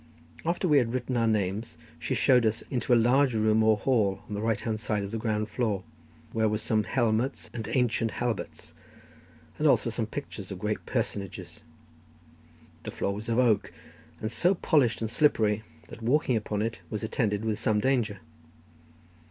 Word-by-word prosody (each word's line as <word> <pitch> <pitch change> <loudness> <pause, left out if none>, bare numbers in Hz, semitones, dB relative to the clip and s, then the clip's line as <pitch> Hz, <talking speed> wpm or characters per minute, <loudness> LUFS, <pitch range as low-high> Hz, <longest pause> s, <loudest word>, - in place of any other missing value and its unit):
After 175 +3 0
we 150 -3 +5
had 120 -1 -1
written 125 0 -2
our 115 -1 +2
names, 105 0 -1 0.2
she - - -2
showed 125 -2 +4
us 110 +1 0
into 125 -1 -1
a - - +8
large 125 +2 +3
room 110 0 +3
or 110 -1 +4
hall 105 -5 +1
on - - -7
the 100 - -3
right 110 -2 0
hand 110 -1 -2
side 105 -2 -1
on 100 - -5
the 115 - -3
ground 110 -1 -1
floor, 110 -5 -1 0.5
where 110 -1 +2
were 105 - 0
some 110 -1 0
helmets 115 -1 0
and 110 -2 -5
ancient 120 -3 +1
halberts, 120 -4 -4 0.9
and - - +3
also - - +3
some - - -2
pictures - - -7
of - - -5
great - - -3
personages. 100 -3 -4 1.2
The - - -6
floor 100 - -2
was 105 +3 -6
of 115 - +1
oak, 115 -5 +3 0.5
and 110 - -3
so 180 +8 +2
polished 140 -11 +2
and 110 -1 -2
slippery 110 -7 +2 0.3
that - - -10
walking 125 +2 +2
upon 105 -1 -1
it 115 0 -3
was 105 0 -4
attended 110 -1 -1
with 110 -1 -1
some 110 -2 +2
danger. 115 -5 0
110 Hz, 175 wpm, -28 LUFS, 105-120 Hz, 1.2 s, a